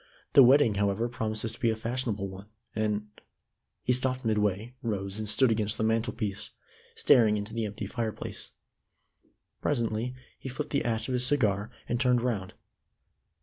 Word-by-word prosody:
The 140 - +9
wedding, 130 -2 +6
however, 100 +4 +1
promises 110 -2 -3
to - - -11
be 115 - +2
a 110 - +1
fashionable 115 -3 -2
one, 95 +2 -10 0.3
and 105 -1 0 0.4
" - - -54
He 125 - +2
stopped 130 0 -2
midway, 105 +1 0
rose, 100 -3 -3
and 110 -1 -3
stood 115 +4 +4
against 105 -1 0
the - - -1
mantel 110 +1 +1
piece, 105 -2 -3 0.5
staring 110 -3 +5
into 105 +1 -5
the 115 -1 -1
empty 105 0 -5
fireplace. 110 +1 -4 1.1
Presently 120 -2 -1 0.2
he 130 - -6
flipped 145 +4 -5
the 140 - +1
ash 115 -1 0
of 130 - -2
his 125 0 +2
cigar, 110 -7 +2 0.2
and 120 +1 0
turned 125 -2 +3
round. 105 -7 -2
110 Hz, 165 wpm, -29 LUFS, 105-125 Hz, 1.1 s, The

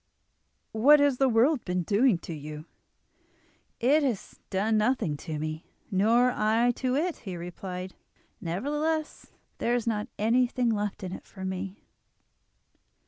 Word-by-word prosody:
"What 275 +7 +6
has 285 -3 +3
the 270 -1 +4
world 245 +4 +3
been 180 -1 -1
doing 210 +3 +3
to 170 - -5
you?" 150 0 -8 1.1
"It 280 +6 +4
has 250 -9 -3
done 210 +4 +1
nothing 215 - +1
to 155 0 -5
me, 155 +1 -5 0.2
nor 230 +6 +4
I 225 +2 +2
to 255 -1 0
it," 330 +4 0
he 190 -5 -7
replied. 180 +1 -6 0.5
"Nevertheless 295 - -2 0.3
there 240 - +1
is 240 - -1
not 215 -2 -1
anything 240 +2 +2
left 205 -2 -2
in 185 - -4
it - - -9
for 190 -1 -8
me." 190 +1 -5
220 Hz, 140 wpm, -28 LUFS, 185-255 Hz, 1.1 s, What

